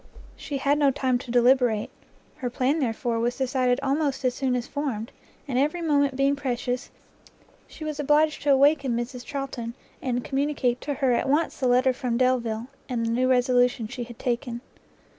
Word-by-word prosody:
She 285 - -5
had 280 +2 +1
no 285 -2 +5
time 260 -2 0
to 245 - -11
deliberate; 245 -2 +3 0.5
her 250 - -3
plan, 260 +5 0
therefore, 230 -2 -1
was 240 +2 -1
decided 255 -1 +1
almost 275 -1 0
as 250 - +2
soon 255 0 0
as 245 -1 -2
formed, 255 -7 -4 0.4
and 255 -2 0
every 305 +5 0
moment 285 -4 +2
being 275 +1 +2
precious, 250 -2 -3 0.8
she - - -10
was 305 -1 -4
obliged 300 +2 +2
to 285 - +2
awaken 275 -2 +4
Mrs 245 +1 -5
Charlton, 255 -4 -5 0.3
and 245 -2 -1
communicate 270 -3 0
to 285 -1 -3
her 265 -2 +1
at 245 +2 +1
once 305 +4 +1
the 260 - +1
letter 255 +1 +4
from 250 -2 -2
Delvile, 235 -3 +1 0.2
and 235 -2 -1
the 230 - 0
new 255 +2 +1
resolution 245 -2 +3
she 245 +2 -5
had 240 -1 -11
taken. 240 -1 -2
255 Hz, 180 wpm, -25 LUFS, 245-280 Hz, 0.8 s, no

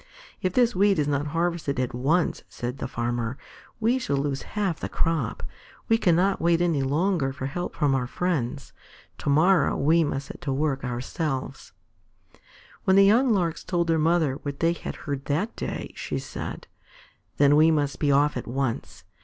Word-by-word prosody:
"If 185 -2 -1
this 245 0 +3
wheat 200 +1 +3
is 150 -2 +1
not 145 0 0
harvested 165 -3 -1
at 125 -2 -1
once," 150 +8 +1
said 125 +2 -5
the - - -3
Farmer, 120 +1 -2 0.4
"we 235 +4 +2
shall 140 - -1
lose 140 -1 -1 0.2
half 195 -6 0
the - - -4
crop. 160 -8 -1 0.5
We 225 0 +4
cannot 180 +2 +2
wait 170 0 +3
any 170 -5 +1
longer 150 +1 +1
for 135 -1 -6
help 175 +6 -4
from 145 -4 +2
our 125 -2 0
friends. 140 -6 -2 0.5
Tomorrow 155 +2 +3
we 165 +4 +3
must 140 -2 -2
set - - -9
to 140 - -2
work, 135 0 -1
ourselves." 130 - -4 1.1
When 190 - +3
the 195 0 +7
young 240 +5 +4
Larks 170 -7 0
told 175 -2 0
their 165 -1 +1
mother 155 -4 +2
what 140 -1 -5
they 165 +1 +2
had - - -6
heard 140 -2 -3
that 170 +11 -1
day, - - -5
she - - -4
said: - - -6 0.7
"Then 145 0 +5
we 155 +2 +6
must 145 -3 0
be 145 -2 +2
off 145 +2 +3
at 125 - -5
once. 130 -1 -3
150 Hz, 175 wpm, -25 LUFS, 135-175 Hz, 1.1 s, the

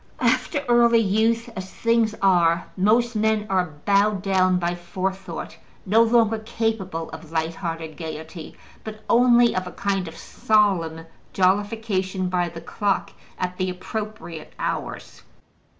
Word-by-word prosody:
After 255 +4 +1
early 235 -1 +5
youth, 225 +2 +2
as 190 0 -6
things 230 -1 +1
are, 170 -3 +3
most 230 +5 +2
men 215 0 +1
are 180 -5 0
bowed 200 -1 +2
down 185 -2 +3
by 175 0 -1
forethought, 185 0 -5 0.3
no 215 +4 +4
longer 225 -1 +3
capable 220 -7 -3
of 160 0 -10
light 160 0 -1
hearted 165 -2 -5
gaiety, 160 0 -8 0.3
but 215 0 -8
only 240 0 +5
of 185 0 -2
a - - -7
kind 195 -3 -2
of 165 0 -9
solemn 180 -7 +1 0.3
jollification 190 -1 0
by 175 -1 0
the 165 0 -9
clock 200 +4 -1 0.3
at 180 0 -3
the 185 -1 -1
appropriate 195 -2 -6
hours. - - -4
195 Hz, 135 wpm, -23 LUFS, 175-220 Hz, 0.3 s, early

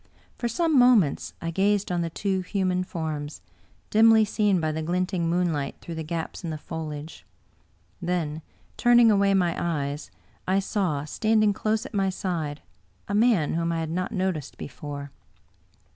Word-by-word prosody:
For 240 - -2
some 310 +4 +2
mo 250 0 +7
ments 165 -11 0
I 165 - -2
gazed 200 +2 +1
on 175 -1 0
the 170 - -1
two 190 +3 -1
human 185 -1 0
forms, 155 -4 -5 0.5
dimly 220 0 +6
seen 210 -3 +2
by 155 -1 0
the 160 +1 -3
glinting 180 +1 -1
moonlight 165 -5 0
through 170 - -8
the 160 - -4
gaps 165 +3 -5
in 170 - -3
the 155 - -3
foliage. 155 0 -7 0.8
Then 170 -3 -2 0.4
turning 240 -1 +6
away 200 -1 +3
my 175 -3 +2
eyes, 145 -3 -2 0.4
I 190 +1 +2
saw, 185 -7 -1
standing 215 +5 +2
close 215 +3 -1
at 270 - -9
my 195 -2 +1
side, 165 -6 -3 0.4
a 200 - -3
man 210 -8 +3
whom 170 +1 0
I 165 - -1
had 160 -1 -3
not 185 +4 -2
noticed 185 - -2
before. 145 -1 -7
180 Hz, 160 wpm, -26 LUFS, 160-205 Hz, 0.8 s, mo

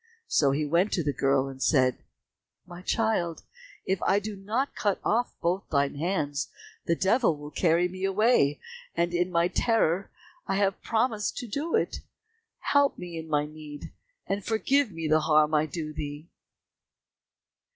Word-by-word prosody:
So 140 - +3
he 145 +3 0
went 170 +7 +2
to 170 - +1
the 145 -1 0
girl 135 0 +2
and 135 -1 -9
said, 130 -4 +3 0.7
"My 175 0 -10
child, 185 -5 0 0.4
if 190 -1 0
I 195 - +3
do 205 +1 -3
not 220 +8 -2
cut 205 -2 0
off 240 +3 0
both 180 +3 -1
thine 140 -2 +1
hands, 145 -3 -2 0.4
the 170 - +3
devil 195 0 +2
will 150 0 -9
carry 170 +1 +2
me 185 +1 -8
away, 195 - +3 0.4
and 170 0 +1
in 175 +1 +1
my 170 -1 +2
terror 195 -3 +1 0.4
I 195 - 0
have 195 -1 +1
promised 225 -2 0
to 245 - -4
do 290 - -2
it. 450 - 0 0.7
Help 285 -1 +4
me 175 -1 -7
in 160 0 -6
my 150 -1 +1
need, 150 -1 -10 0.3
and 200 0 -2
forgive 260 +5 +2
me 165 -2 -4
the 155 +1 +4
harm 155 0 +3
I 155 0 +3
do 155 -2 -5
thee." 150 +2 -6
175 Hz, 160 wpm, -27 LUFS, 150-205 Hz, 0.7 s, Help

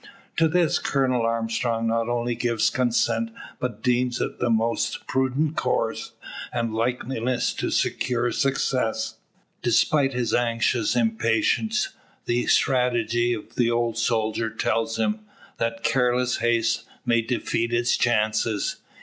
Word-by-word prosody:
To 165 - +4
this 170 0 +2
Colonel 130 -3 +1
Armstrong 115 0 -1
not 115 +1 0
only 120 0 0
gives 115 -1 +1
consent, 115 -3 +1 0.3
but 125 -4 -4
deems 125 -1 +1
it - - -3
the 120 - +1
most 115 0 0
prudent 130 +4 0
course, - - -1 0.4
and 115 -2 -2
likeliest 125 +1 -1
to - - -1
secure 125 -1 0
success. 130 -5 0 0.4
Despite 135 +4 +2
his 120 -2 -1
anxious 120 -1 +1
impatience, 115 - +1 0.4
the 120 +1 0
strategy 120 -2 +2
of 110 - -7
the 120 -2 +2
old 120 -1 0
soldier 115 -1 0
tells 115 +1 -1
him, 210 - 0 0.4
that 115 0 -2
careless 125 -1 +2
haste 115 -1 +1 0.2
may 115 -1 +3
defeat 115 0 -1
its 120 +1 +2
chances. 110 - +1
120 Hz, 125 wpm, -24 LUFS, 115-125 Hz, 0.4 s, To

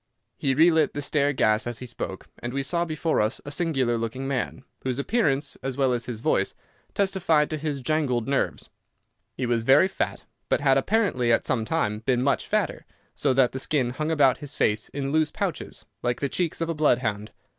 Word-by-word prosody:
He 135 -1 0
relit 160 0 +4
the 145 - -2
stair 145 0 +2
gas 110 -4 +2
as 120 -1 -2
he 125 - -7
spoke, 120 - -6
and 120 +1 -5
we 140 - 0
saw 170 +5 0
before 160 -3 0
us 110 +3 -1
a 145 - -6
singular 135 -9 0
looking 120 +4 -3
man, 130 -1 -2 0.2
whose 130 -1 -2
appearance, 145 - 0
as 135 -1 -4
well 135 -2 +2
as 120 -1 -2
his 115 -3 -5
voice, - - +1 0.4
testified 180 -7 +2
to 155 - -1
his 150 -2 -3
jangled 130 -4 0
nerves. 140 0 -1 0.7
He 130 - -1
was 120 -1 +1
very 135 +10 +5
fat, - - -3 0.3
but - - +2
had 135 -2 +4
apparently 165 - +1
at 115 - +2
some 115 -4 0
time 105 -8 0
been 125 +2 +1
much 140 - +1
fatter, - - -1 0.3
so 140 - +1
that 130 -2 +4
the 130 - -4
skin 130 -3 0
hung 155 +5 -3
about 145 -5 +3
his 145 0 -7
face 105 0 +1
in 140 -1 -3
loose 155 0 +2
pouches, - - -4 0.2
like 120 0 -1
the 140 - -1
cheeks 170 +1 -1
of 165 - -1
a - - +1
blood 150 -5 +3
hound. 105 -3 -3
135 Hz, 205 wpm, -25 LUFS, 120-155 Hz, 0.7 s, very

